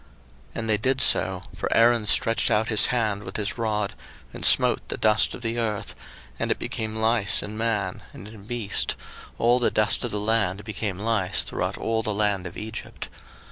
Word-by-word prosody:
02:008:017 - - -28 0.5
And 115 0 -4
they 105 - +3
did 130 +4 0
so; 95 -7 +3
for - - -3
Aaron 115 -1 +4
stretched 115 +2 +3
out 110 -1 +1
his 110 -3 +5
hand 110 -5 -1
with 95 -1 -6
his 105 +2 -3
rod, 105 -3 -1 0.4
and - - -8
smote - - +5
the - - -4
dust 110 0 +2
of 120 - -11
the 115 +1 -2
earth, 110 -3 -3 0.5
and - - -2
it - - +1
became 110 -1 -5
lice 110 -2 +1
in 105 +1 -7
man, 105 -4 -2
and 95 - -11
in 105 -2 -13
beast; 115 -3 0 0.4
all 120 +2 +3
the 120 - +2
dust 110 0 +1
of 120 - -2
the 105 - -3
land 105 -2 0
became 105 -3 -4
lice 105 -3 0
throughout - - -3
all 115 0 -1
the 105 -2 -2
land 100 -3 0
of 90 - -10
Egypt. 110 +1 -7
110 Hz, 195 wpm, -24 LUFS, 105-115 Hz, 0.5 s, his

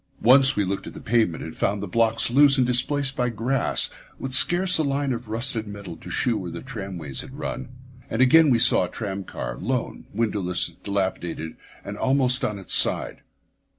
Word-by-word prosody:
Once 135 +3 +6
we 105 - 0
looked 95 +1 -4
at - - -9
the - - -10
pavement 110 -7 0
and 80 - -8
found 100 +1 -1
the 100 - -5
blocks 115 0 +1
loose 140 +2 +5
and 130 - +3
displaced 135 +2 +1
by 125 -1 0
grass, 120 +4 0 0.3
with 135 -1 -6
scarce 175 +6 +5
a - - +2
line 140 -1 -1
of 120 0 -7
rusted 115 0 -2
metal 100 -4 -8
to - - -12
shew 120 -2 0
where 90 - -6
the 85 0 -8
tramways 95 - -5
had 135 0 -11
run. 130 -3 -5 0.4
And 115 - -3
again 150 +4 +6
we 125 - +4
saw - - +5
a - - -8
tram 100 -3 -5
car, - - -7
lone, 125 +3 -3
windowless, 100 -5 -2
dilapidated, 95 -5 -3 0.3
and 100 +1 -7
almost 130 -1 +1
on 105 - -2
its 95 -3 -4
side. - - +2
115 Hz, 190 wpm, -23 LUFS, 100-130 Hz, 0.4 s, Once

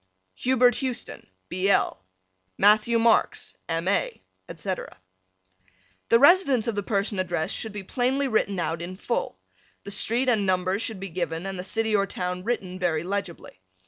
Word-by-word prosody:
Hubert 250 - +3
Houston, 255 -3 -4 0.2
B. 185 +2 -1
L. 95 - +2 0.5
Matthew 215 +3 +4
Marks, 230 0 +2 0.2
M. 165 +1 -1
A., 480 - 0 0.3
etc. 190 - -5 1.1
The 230 - +7
residence 280 - +5
of 230 - 0
the 205 - -1
person 200 -1 -1
addressed 175 -3 -1
should 220 - -4
be 205 -1 -6
plainly 260 +6 0
written 205 -5 0
out 165 -1 -2
in 180 +2 -6
full. 235 - -2 0.5
The 200 - -7
street 230 +5 +1
and 225 -5 +3
numbers 185 +1 0
should 220 -4 -3
be 195 0 -6
given 170 0 -3
and 195 -1 -5
the - - -4
city 220 +2 0
or 200 -1 +2
town 180 -1 -4
written 190 -5 -3
very 170 -3 0
legibly. 180 - -5
200 Hz, 160 wpm, -25 LUFS, 185-230 Hz, 1.1 s, The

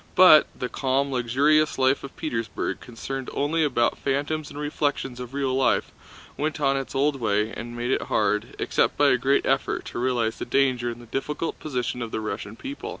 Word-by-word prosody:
But 180 -4 +8
the 125 - -2
calm, 135 +2 0
luxurious 140 +5 +2
life 130 +1 +2
of 140 - -9
Petersburg, 115 -8 -3
concerned 130 +2 -6
only 155 +3 +1
about 125 -5 +1
phantoms 145 +3 -1
and 145 - -10
reflections 145 -4 -2
of 125 +2 -7
real 135 -2 0
life, 130 0 +2 0.4
went 155 +1 -2
on 135 -2 +2
in 135 - 0
its 135 - -10
old 140 +1 +2
way 105 -2 0
and 120 +1 -7
made 120 +2 -1
it - - +1
hard, 105 0 0
except - - +1
by - - +5
a - - +4
great - - +2
effort, - - 0
to - - -3
realize 120 -3 0
the - - -3
danger 125 -2 +1
and 120 0 -7
the - - -12
difficult 150 +7 -3
position 125 -4 -3
of 115 - -3
the 110 - -3
Russian 105 -1 -5
people. 275 - -7
135 Hz, 200 wpm, -25 LUFS, 120-145 Hz, 0.4 s, But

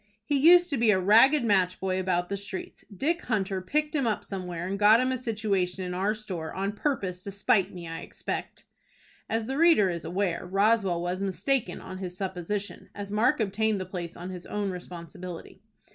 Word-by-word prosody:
"He 290 - 0
used 350 +4 +6
to 280 - +1
be 230 -1 +4
a 200 - +5
ragged 230 +9 +6
match 190 -4 +2
boy 190 0 -1
about 180 -1 0
the 200 - -1
streets. 195 -1 -6
Dick 310 - -1
Hunter 195 -4 -1
picked 300 - -1
him 275 -6 +1
up 215 - -1
somewhere, 180 -3 -5
and 195 +2 -3
got 210 +2 +7
him 255 +1 +1
a 260 - 0
situation 200 -6 -1
in 180 0 -4
our 195 +4 0
store, 185 -7 -5
on 195 +1 -1
purpose 205 -7 -2
to - - -6
spite 195 0 +2
me, 175 -2 -8
I 165 0 -5
expect." - - -6 0.6
As 225 0 -1
the 270 +5 -3
reader 320 - +5
is 170 -1 -5
aware, 175 +1 -1
Roswell 195 -1 +2
was 180 +2 -2
mistaken 200 +1 -1
in 185 0 -8
his 180 -2 -6
supposition, 190 +1 -4
as 200 0 -6
Mark 225 +6 +2
obtained 215 0 0
the 185 - -4
place 175 -2 -6
on 180 +2 -6
his 180 -1 -8
own 205 -2 -2
responsibility. 180 +1 -8
195 Hz, 195 wpm, -27 LUFS, 180-220 Hz, 0.6 s, got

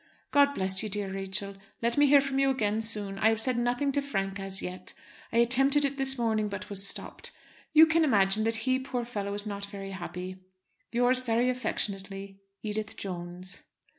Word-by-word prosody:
God 285 0 +4
bless 190 0 +5
you, 215 - -3
dear 200 -1 -2
Rachel. 195 +1 -2 0.2
Let 235 0 0
me 290 0 +4
hear 280 0 +6
from 275 0 -2
you 275 0 +3
again 220 -4 0
soon. 210 -3 -2
I 220 - +4
have 225 -1 0
said 255 +2 +1
nothing 245 +4 0
to 285 +1 0
Frank 195 -8 -3
as 195 0 -2
yet. 180 0 -7 0.4
I - - -1
attempted 270 +5 +5
it 280 0 -2
this 270 -1 +2
morning, 220 -3 0
but 200 0 -7
was 200 0 0
stopped. - - -2 0.4
You 315 +1 +8
can 320 +1 +2
imagine 215 -6 +4
that 225 0 +4
he, 260 0 +2
poor 255 -2 -4
fellow, 205 -4 -4
is 205 +1 -4
not 200 -1 -5
very 195 -1 -8
happy. 185 0 -7 0.5
Yours 245 +2 +3
very 245 0 0
affectionately, 195 -5 -4 0.2
EDITH 215 0 -4
JONES. 180 0 -6
215 Hz, 190 wpm, -28 LUFS, 195-255 Hz, 0.5 s, You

